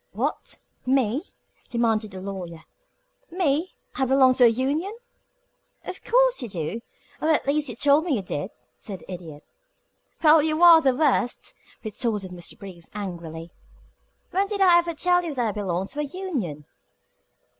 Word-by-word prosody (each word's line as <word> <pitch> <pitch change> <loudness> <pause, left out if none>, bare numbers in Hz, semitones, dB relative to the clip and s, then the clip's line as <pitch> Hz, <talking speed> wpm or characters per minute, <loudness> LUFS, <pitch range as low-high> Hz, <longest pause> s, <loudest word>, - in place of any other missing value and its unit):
"What! - - -3 0.3
Me?" 255 0 +1 0.5
demanded 225 -3 0
the 190 -1 -9
Lawyer. 180 -4 -7 0.7
"Me? 335 0 0 0.2
I 270 - -1
belong 260 0 +5
to 250 -1 +5
a - - +9
union?" 285 - -1 0.9
"Of 370 - -7
course - - +3
you 240 - -5
do 185 +4 -4 0.4
or 315 - +1
at 315 - +2
least 290 0 0
you 240 - -5
told 290 +5 +3
me 315 -6 +1
you 205 - -3
did," 175 +1 -4 0.3
said 195 -5 -7
the - - -12
Idiot. 160 -5 -9 0.8
"Well, 310 0 +7
you 310 +2 +1
are 335 -2 +9
the 265 -4 +2
worst!" 275 -4 0 0.3
retorted 215 -4 -2
Mr. 175 +3 -8
Brief, 190 -6 -11
angrily. 170 -4 -6 0.8
"When 390 +3 +1
did 405 0 -3
I 360 -3 +6
ever 340 -1 -3
tell 355 +2 +2
you 320 -4 -4
that 240 -3 0
I - - -1
belonged 190 -2 -3
to 295 - -6
a - - +1
union?" 275 - -4
255 Hz, 160 wpm, -24 LUFS, 195-320 Hz, 0.9 s, a